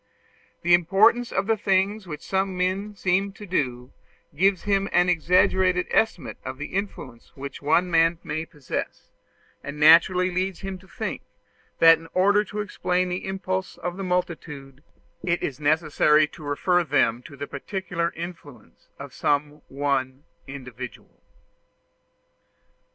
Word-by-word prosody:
The 175 +1 +4
importance 205 +8 +4
of - - 0
the 225 +1 +2
things 195 0 0
which 150 -3 -7
some 190 -1 -1
men 190 +3 -1
are - - -24
seen 195 +1 0
to 210 - -10
do, 125 -9 -2 0.4
gives 190 +3 +2
him 200 -1 +1
an 180 0 +3
exaggerated 180 +2 +3
estimate 220 -6 0
of 130 0 -6
the 150 - -7
influence 185 - -5
which 140 0 -8
one 175 +5 +2
man 165 0 +4
may 160 +1 -4
possess; 145 -6 -6 0.5
and 145 +1 -7
naturally 175 +4 +6
leads 185 0 -2
him 195 -1 -6
to 190 - -19
think, - - -5 0.6
that 165 -1 +7
in 165 - -13
order 200 +3 +4
to 210 +2 -4
explain 185 -3 -1
the 180 +1 -4
impulses 190 -1 -3
of 175 0 -4
the 195 - -5
multitude, 155 -7 -4 0.4
it 175 -1 0
is 140 -1 -3
necessary 155 0 +3
to 170 - -14
refer 175 +5 +1
them 130 -6 +1
to 140 - -12
the 145 - -4
particular 170 +3 -3
influence 160 - -10
of - - -9
some 150 +1 -1
one 135 -1 -2 0.2
individual. 125 -3 -9
175 Hz, 145 wpm, -24 LUFS, 145-190 Hz, 0.6 s, that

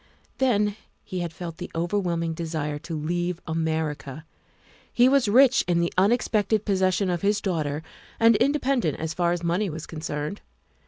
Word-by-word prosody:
Then 210 -6 +2 0.3
he 185 - -5
had 170 -2 -3
felt 165 0 -7
the 180 - -6
overwhelming 170 -1 -1
desire 155 -3 -3
to 165 +1 -5
leave 175 +3 -2
America. 160 -3 -3 0.7
He 245 +1 +5
was 270 -3 +3
rich 260 +4 +5
in 175 -1 +2
the 170 0 0
unexpected 215 +1 +2
possession 190 -1 +1
of 175 - -2
his 205 +1 +2
daughter 155 -6 -2 0.4
and 230 0 +6
independent 255 - +1
as 160 0 -3
far 175 -2 +1
as 175 0 -2
money 180 +4 0
was 160 0 -6
con 160 - -8
cerned. 150 +4 -4
175 Hz, 160 wpm, -25 LUFS, 160-205 Hz, 0.7 s, and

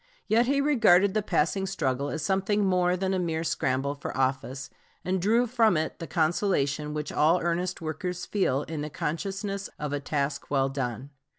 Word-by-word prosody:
Yet 235 +3 +3
he 280 +1 +2
regarded 210 -10 +4
the 215 - +1
passing 195 0 0
struggle 140 -7 -1
as 155 0 -4
something 195 +3 +1
more 180 -1 +2
than 190 +1 -1
a 185 - +1
mere 165 -2 -1
scramble 135 -3 0
for 140 -2 -6
office, 130 0 -1 0.3
and 185 0 0
drew 230 +6 +3
from 225 -6 +3
it 160 +1 -2
the 165 - -6
consolation 155 -3 0
which 150 0 -3
all 160 +4 +3
earnest 175 +2 -1
workers 170 +3 -4
feel 150 -9 0
in 155 -2 -5
the 150 - -4
consciousness 195 +6 -3
of 150 -1 -4
a 145 - 0
task 140 0 -2
well 135 -1 +2
done. 135 0 -4
170 Hz, 180 wpm, -27 LUFS, 145-195 Hz, 0.3 s, regarded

